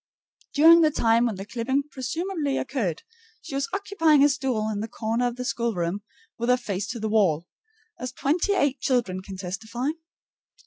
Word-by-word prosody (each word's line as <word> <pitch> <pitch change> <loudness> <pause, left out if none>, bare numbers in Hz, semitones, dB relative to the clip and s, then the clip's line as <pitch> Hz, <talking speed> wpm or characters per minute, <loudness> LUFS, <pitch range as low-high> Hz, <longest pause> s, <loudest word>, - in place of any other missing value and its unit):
During 330 +3 +8
the 310 - +5
time 235 -4 +3
when 220 - -2
the 195 +1 -7
clipping 250 +6 -1
presumably 290 +3 -2
occurred, 225 - -2 0.4
she - - -10
was 275 0 -1
occupying 330 -7 +3
a 290 - +6
stool 255 -6 -1
in 205 - -3
the 220 - -3
corner 230 +2 -1
of 240 - -4
the 250 0 -5
schoolroom 205 -7 -1 0.4
with 235 +1 -1
her 250 - +5
face 205 -4 -3
to 230 +1 -5
the 220 - -2
wall, 190 -7 +2 0.5
as 250 +1 -4
twenty 325 +10 +1
eight 285 -7 +1
children 230 -8 0
can 190 0 -9
testify. 220 +8 -4
245 Hz, 175 wpm, -25 LUFS, 215-280 Hz, 0.5 s, During